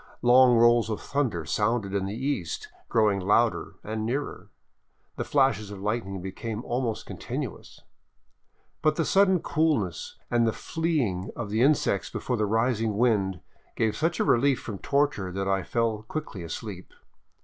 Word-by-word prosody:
Long 125 0 +7
rolls 120 0 +5
of 110 - -2
thunder 120 - -1
sounded 105 +2 0
in 95 -1 0
the 100 - -4
east, 130 - -3 0.2
growing 105 -3 +3
louder 105 +5 +1
and 110 0 -3
nearer. 135 +6 -3 0.7
The - - -2
flashes 135 -7 +2
of 100 -1 -8
lightning 95 -3 -3
became 110 +4 -5
almost 120 -2 -2
continuous. - - -6 1.0
But 155 0 +3
the 165 - 0
sudden 190 -3 +4
coolness 145 - 0
and 120 -1 +3
the 110 - +1
fleeing 140 - -1
of 105 -3 -5
the 110 +2 +1
insects 135 -8 +2
before 125 - -2
the 105 -1 +1
rising 115 -1 +1
wind 100 -7 +1 0.3
gave 110 -1 +1
such 165 +2 0
a - - +3
relief 135 +2 +3
from 105 -4 -7
torture 140 -10 0
that 95 +1 -2
I 95 0 +1
fell 110 +3 -1
quickly 110 - -6
asleep. 90 +3 -7
115 Hz, 150 wpm, -27 LUFS, 100-130 Hz, 1.0 s, Long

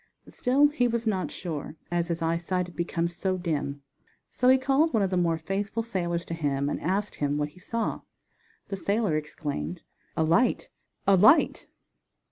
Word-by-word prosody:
Still 275 +4 +3
he 270 -5 +1
was 235 0 -1
not 195 -4 0
sure, 160 -4 -5 0.2
as 170 -1 0
his 170 -1 -2
eyesight 170 +2 0
had 175 - -13
become 170 0 -1
so 185 +2 -2
dim. 145 -5 -3 0.5
So 250 - +2
he 260 - +7
called 275 +5 +2
one 215 - +3
of 190 - 0
the - - +1
more 170 -2 +2
faithful 195 +6 -2
sailors 175 -6 -2
to - - -5
him 145 -3 0
and - - -3
asked 200 +4 -1
him 145 0 0
what 150 0 -1
he 165 - -18
saw. 230 +4 -2 0.7
The 195 - -3
sailor 200 -1 0
exclaimed: 145 - -4 0.3
"A 160 - +3
light, 170 +11 +2 0.4
a 195 0 +6
light!" 215 - +5
180 Hz, 175 wpm, -27 LUFS, 165-215 Hz, 0.7 s, he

